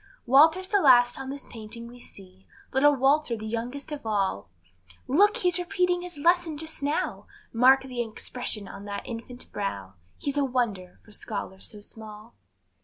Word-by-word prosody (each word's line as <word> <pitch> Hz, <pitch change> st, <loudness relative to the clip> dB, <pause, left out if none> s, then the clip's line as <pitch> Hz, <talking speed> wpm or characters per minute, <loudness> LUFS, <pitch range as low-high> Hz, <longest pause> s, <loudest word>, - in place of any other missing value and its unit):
Walter's 320 Hz, +9 st, +5 dB
the 405 Hz, -2 st, +3 dB
last 245 Hz, -3 st, +5 dB
on 265 Hz, 0 st, -6 dB
the 275 Hz, -, -4 dB
painting 230 Hz, +1 st, -8 dB
we 245 Hz, +1 st, -12 dB
see, 190 Hz, -4 st, -15 dB, 0.3 s
Little 290 Hz, +2 st, +5 dB
Walter, 270 Hz, -2 st, +2 dB
the 215 Hz, -, -7 dB
youngest 240 Hz, +7 st, -4 dB
of 295 Hz, -1 st, -5 dB
all; 195 Hz, -, -1 dB, 0.6 s
Look! 405 Hz, +10 st, +4 dB
he's 360 Hz, -1 st, +1 dB
repeating 360 Hz, -1 st, 0 dB
his 355 Hz, -3 st, -5 dB
lesson 340 Hz, 0 st, +2 dB
just 320 Hz, 0 st, -4 dB
now, 290 Hz, +2 st, -2 dB, 0.3 s
Mark 260 Hz, +3 st, +6 dB
the 250 Hz, -2 st, -4 dB
expression 225 Hz, -2 st, -4 dB
on 200 Hz, -, -9 dB
that 200 Hz, 0 st, -5 dB
infant 245 Hz, +1 st, -8 dB
brow, 100 Hz, -, -4 dB, 0.2 s
He's 285 Hz, 0 st, -3 dB
a 285 Hz, -, +3 dB
wonder, 235 Hz, -9 st, -2 dB
for 210 Hz, -, -17 dB
scholar 200 Hz, -2 st, -5 dB
so 210 Hz, +1 st, -8 dB
small. 215 Hz, +1 st, -12 dB
250 Hz, 165 wpm, -27 LUFS, 215-290 Hz, 0.6 s, Mark